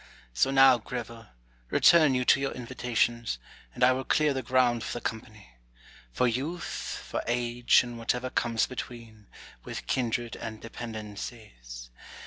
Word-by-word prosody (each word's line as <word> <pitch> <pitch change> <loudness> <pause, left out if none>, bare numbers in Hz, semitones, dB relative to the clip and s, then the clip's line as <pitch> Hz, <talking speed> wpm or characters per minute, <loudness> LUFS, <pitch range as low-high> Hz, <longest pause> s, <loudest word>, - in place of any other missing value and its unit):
So - - +2
now, 135 -2 +6
Greville, 115 -1 -7 0.4
return 155 - +5
you 125 0 0
to 135 - +5
your 135 0 -2
invitations, 120 - -1 0.4
and 125 - -1
I 125 - +7
will 130 +1 -1
clear 150 +2 +2
the 135 - -2
ground 125 -3 +2
for - - -4
the 120 - -4
company; 105 - -7 0.5
for 125 - +1
Youth, 145 +9 -4
for - - -2
Age, 120 0 +3
and 120 -1 -8
whatever 125 +2 -1
comes 115 -2 +1
between, 115 -4 -9 0.4
with - - -7
kindred 120 -2 -1
and 110 -1 -7
dependencies. 105 - -8
120 Hz, 140 wpm, -28 LUFS, 110-130 Hz, 0.5 s, I